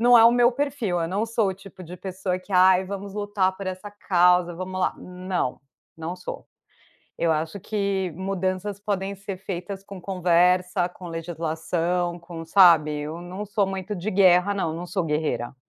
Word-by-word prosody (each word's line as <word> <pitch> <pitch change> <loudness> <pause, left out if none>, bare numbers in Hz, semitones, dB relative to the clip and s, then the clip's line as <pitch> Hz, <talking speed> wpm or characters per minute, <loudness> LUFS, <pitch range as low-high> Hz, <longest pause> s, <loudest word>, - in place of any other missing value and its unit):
Não 245 +1 +7
é 225 - +8
o 235 - +7
meu 240 0 +5
perfil, 260 -8 -1
eu 165 - 0
não 200 +6 -1
sou 225 -2 +1
o 190 - -2
tipo 195 0 -13
de 175 0 -9
pessoa 185 0 -3
que: 185 - -20
"Ai, 185 0 +5
vamos 200 0 -6
lutar 205 -2 0
por 195 0 -7
essa 185 +2 -5
causa, 180 -3 +3
vamos 185 +1 -5
lá", - - +1
não, 180 -6 -3 0.3
não 165 +2 -5
sou. 180 - -7 0.7
Eu 170 - +2
acho 160 +5 -1
que 200 -2 -1
mudanças 190 +1 -2
podem 200 -1 -2
ser 195 0 -6
feitas 190 +1 -6
com 195 -1 -9
conversa, 180 0 +2
com 180 0 -12
legislação, 170 +1 -2
com 170 -1 -9
sabe, 165 -4 +6
eu 155 +3 -5
não 185 +4 -6
sou 205 0 0
muito 195 +1 -4
de 195 +3 -3
guerra 190 0 +4
não, 175 -5 -1
não 175 +2 -6
sou 180 0 -2
guerreira. 150 -7 -2
185 Hz, 180 wpm, -24 LUFS, 175-200 Hz, 0.7 s, é